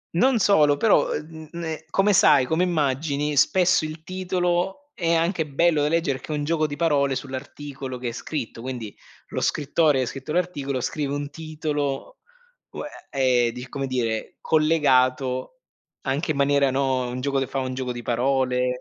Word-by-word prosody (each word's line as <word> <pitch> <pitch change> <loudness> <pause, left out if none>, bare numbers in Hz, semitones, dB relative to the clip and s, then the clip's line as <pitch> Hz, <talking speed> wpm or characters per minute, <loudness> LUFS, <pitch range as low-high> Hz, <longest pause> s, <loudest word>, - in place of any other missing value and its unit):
Non 250 +7 +4
solo, 150 -9 +4
però 215 +6 +3
ehm, 150 - -3
uhm, 160 -1 -11
ne 160 -2 -5
come 200 +1 +3
sai 150 -9 +6
come 160 +6 0
immagini, 150 -3 0
spesso 180 +2 +4
il 155 +1 -6
titolo, 185 - -2
è 170 -6 +1
anche 165 -1 0
bello 155 +2 +2
da 145 - +2
leggere 160 -4 +1
perché 155 - -6
è - - 0
un 145 - -2
gioco 155 0 +1
di 145 - -5
parole 145 -4 +2
sull'articolo 135 -1 -6
che 125 -1 -3
è - - -5
scritto, 120 -2 -5
quindi, 120 -5 -6 0.3
lo - - -3
scrittore 150 0 +2
che 130 - +2
ha 125 - -4
scritto 135 +4 -6
l'articolo 145 -8 -1
scrive 140 +1 -2
un 145 0 -4
titolo, 155 - -3 0.6
uhm, - - -5 0.3
e, 130 -3 +2
ehm, 115 - -3
di 125 +1 -8
come 135 -1 -3
dire, 115 -4 -2
collegato, 135 - +2 0.4
anche 140 +5 -2
in 140 - -3
maniera, 140 -1 +3
no, 130 -1 0
un 125 +1 -4
gioco 140 +1 0
che 135 - -1
fa 135 - -5
un 130 -1 -3
gioco 130 -1 -3
di 120 -1 -6
parole, 125 +1 +1
145 Hz, 180 wpm, -24 LUFS, 130-165 Hz, 0.6 s, sai